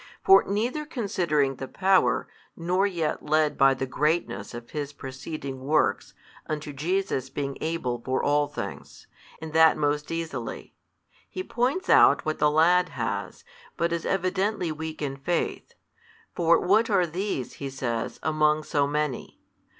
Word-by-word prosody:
For 385 0 +7
neither 235 +9 -1
considering 175 - 0
the 135 - -6
power, 190 +4 +2 0.3
nor 180 +4 +1
yet 170 -5 -2
led 155 0 +2
by 135 0 +5
the 130 - -3
greatness 150 - -1
of 120 0 -9
His 145 -1 -4
preceding 135 0 -7
works 150 +4 0 0.3
unto 150 -1 -4
Jesus' 160 -3 -1
being 140 -1 -4
able 130 -7 -2
for 130 0 -1
all 145 0 +2
things, - - -8 0.3
and 160 0 -8
that 160 0 +6
most 150 0 0
easily; 165 -1 -5 0.6
he 370 - -5
points 270 +7 -1
out - - +5
what 155 0 -2
the 150 - +4
lad 175 +4 +4
has, - - -4 0.3
but 170 0 0
is 170 - -2
evidently 190 -1 0
weak 155 0 -6
in 135 -1 -3
faith: 165 +5 -3 0.6
for 170 0 +3
what 215 +5 +3
are 190 -4 +3
these 175 - -3
(he 140 - -3
says) 120 -4 -3
among 155 0 +2
so 145 -2 +1
many? 150 -2 -3
155 Hz, 145 wpm, -26 LUFS, 140-180 Hz, 0.6 s, For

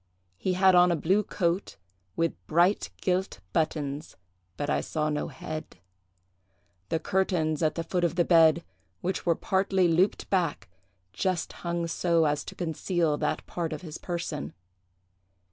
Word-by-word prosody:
He 185 - 0
had 190 +1 +5
on 180 0 +6
a - - +3
blue 185 +6 +2
coat, 175 - -1 0.4
with 165 0 +1
bright 175 +5 +3
gilt 185 +1 -1
buttons, 150 -2 -2 0.4
but 145 - -2
I - - +1
saw 155 -1 -1
no 150 - -1
head; 155 0 -7 1.1
the - - +1
curtains 165 -3 0
at 155 -2 +1
the 165 - -2
foot 175 +1 -1
of 170 -1 +1
the 175 -2 +3
bed, 165 -1 +5 0.4
which 185 0 -2
were 170 - +4
partly 190 0 +2
looped 175 +4 +2
back, 180 -6 0 0.5
just 185 - -1
hung 170 -1 -3
so 165 0 +2
as 145 -1 0
to - - -8
conceal 165 -1 0
that 150 - -1
part 170 -2 -3
of 155 - -7
his 160 -2 -7
person. 170 - -4
170 Hz, 150 wpm, -28 LUFS, 155-180 Hz, 1.1 s, on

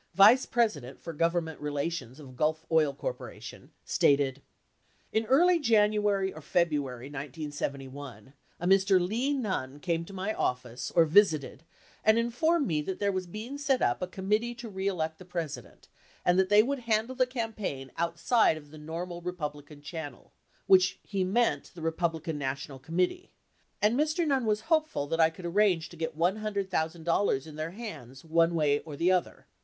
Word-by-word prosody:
vice 215 +7 +7
president 165 - 0
for 165 - -7
Government 165 0 -1
relations 145 -2 -3
of 130 -4 -12
Gulf 155 +4 0
Oil 155 -3 +4
Corp., 140 - -5 0.6
stated: 140 -1 +2 0.7
[I]n 220 +1 +1
early 340 +7 +5
January 210 -5 +2
or 155 - -10
February, 145 -7 -1
a - - -14
Mr. 145 - -2
Lee 245 +8 0
Nunn 165 - -3
came 165 +1 -1
to 170 - -11
my 195 +2 -3
office 125 - -2
or 165 -2 +4
visited 160 -5 +3 0.4
and 220 +1 +5
informed 280 +8 +2
me 155 -4 0
that 185 +5 -4
there 200 -1 +1
was 185 -1 -3
being 225 +10 -7
set 275 -3 +1
up 120 0 +1
a 180 - -1
Committee 210 +6 -1
To 235 -1 -8
Re 190 -1 -3
Elect 160 -4 -2
the - - -10
President 170 -4 -6 0.4
and 180 +1 +4
that 190 0 +2
they 210 +1 +7
would 275 +3 -2
handle 230 +1 0
the 255 -1 +2
campaign 215 - -4
outside 170 +3 +2
of 145 -2 -13
the 155 - -11
normal 170 +3 -6
Re 180 +1 -3
publican 150 -3 -7
channel 160 -2 -8 0.3
which 190 0 +5
he 195 -2 -1
meant 230 +6 +1
the 170 - -9
Republican 165 -1 -1
National 135 0 -4
Committee, 180 - -1 0.5
and 215 +3 +4
Mr. 310 +4 +1
Nunn 270 -6 +1
was 210 0 +1
hopeful 310 - +1
that 165 +3 -2
I 160 -1 +6
could 175 +2 -11
ar 170 - -2
range 185 -5 +2
to - - -12
get 160 -1 -4
$100,000 180 -5 0
in 155 - -10
their 155 +1 -3
hands 135 - -8
one 165 +1 +3
way 145 -2 +2
or 155 -3 -9
the 170 +5 +2
other. 180 -1 -1
175 Hz, 170 wpm, -29 LUFS, 150-215 Hz, 0.7 s, vice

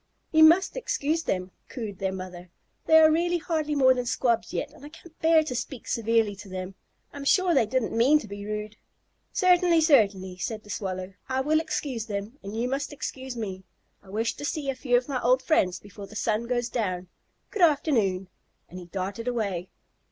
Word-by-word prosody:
"You 315 -1 +6
must 340 +5 +6
excuse 325 - -1
them," 185 - -2 0.2
cooed 215 -7 -6
their 190 -1 -1
mother. 185 -1 -8 0.4
"They 320 - +7
are 315 -1 +7
really 345 +2 +2
hardly 310 -3 -2
more 260 -2 +6
than 250 -1 -3
Squabs 235 -1 0
yet, - - -3
and 305 -1 -17
I 290 - -9
can't 325 +1 -16
bear 320 -1 +5
to 300 - -4
speak 245 0 -5
severely 225 -2 +1
to 205 0 -11
them. 185 0 -5 0.4
I'm 285 - -7
sure 365 +5 +3
they 250 -7 +3
didn't 255 -2 -1
mean 255 +7 +5
to 260 - -6
be 200 0 -7
rude." 210 0 -5 0.5
"Certainly, 355 -3 +4
certainly," 200 - +3
said 215 +2 -4
the 210 - -10
Swallow. 185 0 -4 0.2
"I 260 0 +1
will 310 +3 +2
excuse 260 -8 -3
them 210 +6 -5
and 200 +3 -7
you 240 +2 0
must 275 +4 -2
excuse 265 -3 -6
me. 190 -4 -5 0.4
I 195 - -18
wish 225 +3 -1
to - - -7
see 290 -1 -2
a - - -7
few 250 -1 +2
of 245 - -2
my 270 -3 -2
old 255 +2 +3
friends 185 - +2
before 200 0 -11
the 215 - -13
sun 220 +2 -1
goes 240 -1 0
down. 185 -7 -2 0.4
Good 420 - -3
afternoon!" 235 - +2 0.4
And 180 - -8
he 180 - -10
darted 195 +6 -5
away. 200 -7 -2
235 Hz, 200 wpm, -26 LUFS, 200-295 Hz, 0.5 s, They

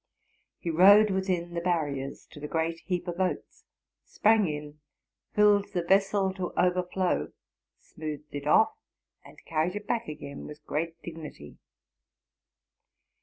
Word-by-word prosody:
He 170 - -3
rode 200 +5 +7
within 185 -3 -1
the 170 - -2
barriers 145 -6 -2
to - - -11
the 150 - -5
great 165 +1 -1
heap 180 0 -3
of 175 +1 -4
oats, 185 -1 -3 0.4
sprang 215 -2 +3
in. 150 0 -6 0.6
filled 205 -1 +4
the 175 -2 0
vessel 195 +1 +2
to 185 -2 -4
overflow, 180 +1 +1 0.4
smoothed 155 -1 -8
it 145 0 -5
off, 220 - +5 0.5
and - - -15
earried 165 +3 0
it 205 0 -5
back 230 0 -1
again 140 -2 -7
with 150 0 -11
great 165 +2 -3
dignity. 160 - -9
175 Hz, 130 wpm, -28 LUFS, 155-190 Hz, 0.6 s, rode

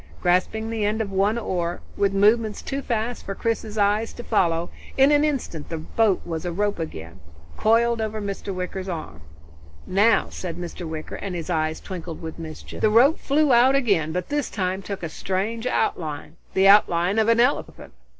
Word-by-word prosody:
Grasping 200 +5 +1
the 225 -2 -2
end 210 +2 0
of 210 -3 -2
one 200 +4 +2
oar, 175 -6 -2 0.2
with 200 -1 +2
movements 210 +2 +2
too 275 0 -3
fast 235 -1 -2
for 195 - -5
Chris's 220 -1 -2
eyes 210 +2 +1
to 240 - -8
follow, 170 -7 +1 0.3
in 270 +2 +6
an 295 0 +4
instant 265 - -2
the 165 - -3
boat 195 +5 +1
was 165 -2 -4
a 175 - -2
rope 205 +2 -1
again, 85 - -7 0.4
coiled 230 - +2
over 220 0 -3
Mr. 200 -1 -4
Wicker's 185 +1 -4
arm. 90 - -6 0.6
"Now!" 205 +5 +3
said 175 -3 -6
Mr. 175 -1 -6
Wicker, 155 -1 -6
and 195 -3 -5
his 170 +1 -4
eyes 155 -1 0
twinkled 175 -3 -7
with 160 0 -7
mischief. 160 -1 -8
The 215 - +4
rope 250 +9 +5
flew 290 -1 +2
out 250 +3 +5
again, 200 - +2
but 180 +2 -3
this 290 -2 -1
time 185 -1 -2
took 195 -1 -6
a - - -1
strange 205 +8 -3
outline 155 -10 -2 0.2
the 190 +1 +5
outline 195 -1 +5
of 220 - +2
an 230 0 +4
elephant. 240 - 0
200 Hz, 185 wpm, -24 LUFS, 170-225 Hz, 0.6 s, in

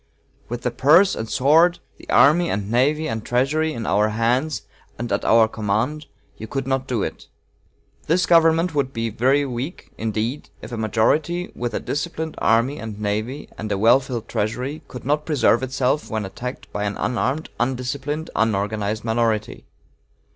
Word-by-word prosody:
With 120 +1 -5
the 125 - 0
purse 155 +10 +5
and 110 0 -4
sword, 165 +6 +4 0.2
the - - -16
army 170 +4 +5
and 100 +1 -2
navy 150 +6 +2
and 110 -1 -3
treasury, 145 +7 +1
in 115 -6 -5
our 105 +3 +2
hands 120 +7 0 0.3
and 120 -1 -4
at 100 - 0
our 115 0 +5
command, 110 +9 -2 0.3
you 110 - -7
could 135 +2 -3
not 135 0 -1
do 120 -6 -1
it. - - -6 0.8
This 170 +2 +3
government 165 0 +4
would 135 -2 -1
be 115 0 -2
very 135 +6 +2
weak, 130 +6 -6
indeed, 110 +5 -2
if 110 - -10
a - - -3
majority, 145 - 0
with 120 -2 -3
a - - 0
disciplined 160 +1 -3
army 115 +6 +2
and 110 -2 -7
navy 110 +7 -3
and 110 -1 -4
a 100 - +1
well 115 +6 +5
filled 125 -4 -6
treasury, 125 +8 -2
could 125 - -9
not 150 +2 +1
preserve 140 -6 +2
itself 130 +2 -1
when 110 -3 -2
attacked 125 +6 -7
by 105 - -2
an 100 0 -3
unarmed, 130 +5 -1
undisciplined, 135 +5 -2
unorganized 105 0 0
minority. 110 -2 -1
125 Hz, 165 wpm, -22 LUFS, 110-150 Hz, 0.8 s, purse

